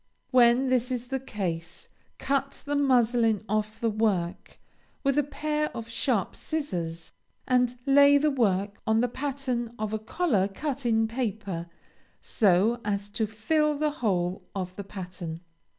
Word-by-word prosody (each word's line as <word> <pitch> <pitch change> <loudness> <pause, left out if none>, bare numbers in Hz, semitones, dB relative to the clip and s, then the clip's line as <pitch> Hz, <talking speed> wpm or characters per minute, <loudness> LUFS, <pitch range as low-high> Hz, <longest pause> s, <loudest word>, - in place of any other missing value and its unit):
When 250 +1 +5
this 250 -1 +1
is 245 -1 -3
the 265 0 -1
case, 175 -9 -5 0.3
cut 275 0 -1
the 290 0 -1
muslin 240 -6 +3
off 215 +1 -1
the 230 - 0
work 200 -5 -1 0.5
with 275 -1 +2
a 295 - +4
pair 300 +1 -2
of 230 0 -7
sharp 230 -5 0
scissors, 170 - -4 0.4
and 250 -1 +2
lay 285 +1 +7
the 300 +1 +2
work 205 -6 0
on 220 +1 +3
the 245 - +2
pattern 255 -2 -3
of 215 0 -3
a 220 - -1
collar 220 - +1
cut 270 +5 -3
in 225 -1 +3
paper, 215 -7 -3 0.5
so 210 +4 +2
as 205 -1 -2
to 220 +1 -1
fill 300 +8 +1
the 300 0 +1
whole 185 -9 -1
of 185 -1 -4
the 200 - -5
pattern. 180 -4 -7
230 Hz, 150 wpm, -27 LUFS, 200-270 Hz, 0.5 s, lay